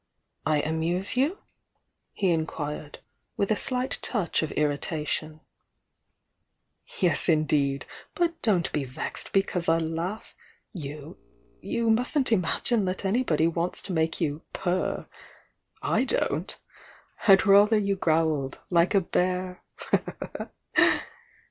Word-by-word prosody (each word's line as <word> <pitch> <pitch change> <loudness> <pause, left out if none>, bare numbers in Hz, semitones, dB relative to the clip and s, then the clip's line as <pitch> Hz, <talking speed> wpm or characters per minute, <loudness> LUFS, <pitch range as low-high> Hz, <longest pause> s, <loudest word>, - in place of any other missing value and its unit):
"I 155 -1 +3
amuse 165 +6 -1
you?" 285 +10 +1 0.7
he 190 -3 +1
inquired, 155 -2 -3 0.4
with 200 +1 0
a - - +4
slight 255 +3 0
touch 205 -8 0
of 160 - -3
irritation. 150 +1 -2 1.6
"Yes, 175 -1 +2
indeed! 145 -4 +2 0.3
But 335 -1 0
don't 190 -7 +2
be 150 - -1
vexed 130 -1 -3
because 185 -3 +1
I 165 - +4
laugh! 165 +6 -3 0.4
You 150 -1 -8 0.2
— - - -35
you 230 -1 +2
mustn't 250 +3 +2
imagine 210 +2 +1
that 185 +2 -3
anybody 190 -7 +2
wants 170 +1 -1
to 190 - -5
make 160 -1 0
you 155 -2 -1
'purr!' 185 0 -1 0.8
/don't! - - 0 0.7
I'd 195 0 +7
rather 205 +2 +6
you 200 -1 +1
growled, 160 -6 0
like 170 +3 +3
a 195 - +5
bear!" 180 +1 -1
175 Hz, 110 wpm, -27 LUFS, 155-200 Hz, 1.6 s, I'd